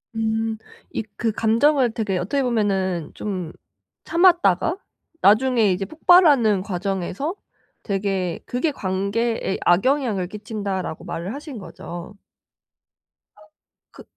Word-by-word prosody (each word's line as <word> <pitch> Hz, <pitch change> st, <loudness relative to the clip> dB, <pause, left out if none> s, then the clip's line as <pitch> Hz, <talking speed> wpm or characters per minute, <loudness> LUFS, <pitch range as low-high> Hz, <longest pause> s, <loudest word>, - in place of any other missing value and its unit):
음. 220 Hz, 0 st, -1 dB, 0.4 s
이 -, -, -2 dB
그 225 Hz, -2 st, 0 dB
감정을 240 Hz, +4 st, +3 dB
되게 205 Hz, -5 st, -1 dB
어떻게 265 Hz, +10 st, -1 dB
보면 195 Hz, -8 st, 0 dB
좀 185 Hz, -6 st, -4 dB, 0.5 s
참았다가 340 Hz, -, +3 dB, 0.4 s
나중에 220 Hz, 0 st, +4 dB
이제 190 Hz, +2 st, -1 dB
폭발하는 285 Hz, -, +5 dB
과정에서 195 Hz, -, -3 dB, 0.5 s
되게 195 Hz, -3 st, -1 dB
그게 275 Hz, +6 st, -1 dB
관계에 200 Hz, +1 st, -1 dB
악영향을 210 Hz, -1 st, +2 dB
끼친다라고 200 Hz, -4 st, -5 dB
말을 180 Hz, +7 st, -4 dB
하신 285 Hz, -3 st, -8 dB
거죠. 175 Hz, +1 st, -9 dB, 1.2 s
아. -, -, -21 dB, 0.5 s
그 -, -, -13 dB
210 Hz, 235 characters per minute, -22 LUFS, 190-250 Hz, 1.2 s, 폭발하는